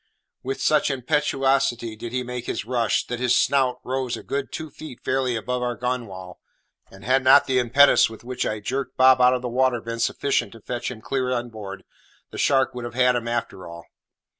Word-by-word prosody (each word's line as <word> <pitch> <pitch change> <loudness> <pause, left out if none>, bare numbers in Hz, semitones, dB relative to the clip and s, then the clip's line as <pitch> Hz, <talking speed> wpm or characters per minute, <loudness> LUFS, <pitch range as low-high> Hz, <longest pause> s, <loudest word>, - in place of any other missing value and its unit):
With 135 +1 -4
such 150 -1 +2
impetuosity 135 -4 0
did 115 +2 -7
he 125 0 -2
make 125 -1 -6
his - - -3
rush, 120 -2 0
that 120 - -5
his 125 -1 +2
snout 130 -3 +1
rose 130 -1 -2
a - - -10
good 140 0 -4
two 160 -1 -6
feet 155 -3 -10
fairly 130 -2 0
above 125 +3 -3
our 120 -1 -2
gunwale; 115 -8 -5 0.5
and 95 +1 -14
had 130 +2 +2
not 135 +2 +7
the 130 -1 +1
impetus 125 +3 +5
with 110 0 -12
which 125 +1 -3
I 110 -1 -3
jerked 130 +4 -4
Bob 130 0 +6
out 125 +1 +5
of 125 - -5
the - - -2
water 125 0 +1
been 115 +1 -6
sufficient 140 +4 0
to 115 - -13
fetch 120 +3 -4
him 120 -4 -9
clear 130 +1 -2
inboard, 110 -6 -5 0.5
the - - -7
shark 135 -2 +2
would 125 -1 -6
have 120 0 -7
had 125 -1 +3
him 120 -1 -2
after 115 -6 -4
all. 85 0 -10
125 Hz, 205 wpm, -23 LUFS, 115-130 Hz, 0.5 s, not